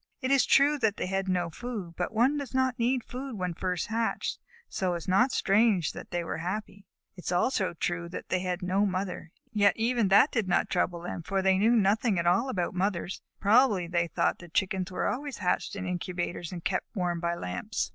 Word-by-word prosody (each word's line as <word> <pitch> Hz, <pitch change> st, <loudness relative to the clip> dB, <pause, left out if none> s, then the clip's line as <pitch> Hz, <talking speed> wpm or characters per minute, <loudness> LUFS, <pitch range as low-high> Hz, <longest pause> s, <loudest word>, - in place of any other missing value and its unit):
It 260 Hz, -1 st, -1 dB
is 275 Hz, -1 st, +4 dB
true 290 Hz, +2 st, +4 dB
that 220 Hz, -4 st, +1 dB
they -, -, -2 dB
had 195 Hz, +1 st, -2 dB
no 175 Hz, -2 st, 0 dB
food, 210 Hz, -4 st, -6 dB
but 180 Hz, -, -2 dB
one 240 Hz, +6 st, +3 dB
does 280 Hz, -2 st, -5 dB
not 260 Hz, -2 st, +1 dB
need 245 Hz, +1 st, +1 dB
food 255 Hz, +1 st, -6 dB
when 180 Hz, -2 st, -2 dB
first 180 Hz, 0 st, -2 dB
hatched, 225 Hz, +1 st, -2 dB, 0.3 s
so 185 Hz, -4 st, -1 dB
it -, -, -1 dB
is 170 Hz, -, -9 dB
not 220 Hz, +8 st, +4 dB
strange 200 Hz, -, +3 dB
that -, -, -9 dB
they 175 Hz, 0 st, -2 dB
were 165 Hz, -, -4 dB
happy. 200 Hz, +2 st, -5 dB, 0.3 s
It 180 Hz, -, -12 dB
is -, -, -1 dB
also 185 Hz, 0 st, +1 dB
true 170 Hz, +1 st, -2 dB
that 175 Hz, -, -7 dB
they 185 Hz, -, +1 dB
had 180 Hz, 0 st, -3 dB
no 190 Hz, +3 st, +2 dB
mother, 185 Hz, -3 st, -3 dB, 0.2 s
yet 205 Hz, -2 st, +4 dB
even 230 Hz, -1 st, +1 dB
that 200 Hz, +9 st, +6 dB
did 225 Hz, -5 st, 0 dB
not 175 Hz, -, +1 dB
trouble 170 Hz, -1 st, 0 dB
them, 175 Hz, 0 st, -5 dB
for 190 Hz, +4 st, -1 dB
they 190 Hz, 0 st, +3 dB
knew 225 Hz, +4 st, +4 dB
nothing 210 Hz, 0 st, +2 dB
at 170 Hz, -, 0 dB
all 190 Hz, +10 st, +3 dB
about 180 Hz, -8 st, -1 dB
mothers. 185 Hz, -1 st, -2 dB, 0.2 s
Probably 210 Hz, -3 st, +4 dB
they 170 Hz, 0 st, 0 dB
thought 170 Hz, 0 st, 0 dB
that 175 Hz, -2 st, -14 dB
Chickens 190 Hz, -1 st, 0 dB
were 180 Hz, -, -2 dB
always 285 Hz, +1 st, -2 dB
hatched 185 Hz, +1 st, -1 dB
in 195 Hz, -2 st, -4 dB
incubators 175 Hz, -1 st, -3 dB
and 175 Hz, -2 st, -7 dB
kept -, -, -2 dB
warm 175 Hz, -3 st, -1 dB
by 170 Hz, 0 st, -1 dB
lamps. 90 Hz, -, -3 dB
190 Hz, 215 wpm, -28 LUFS, 175-225 Hz, 0.3 s, that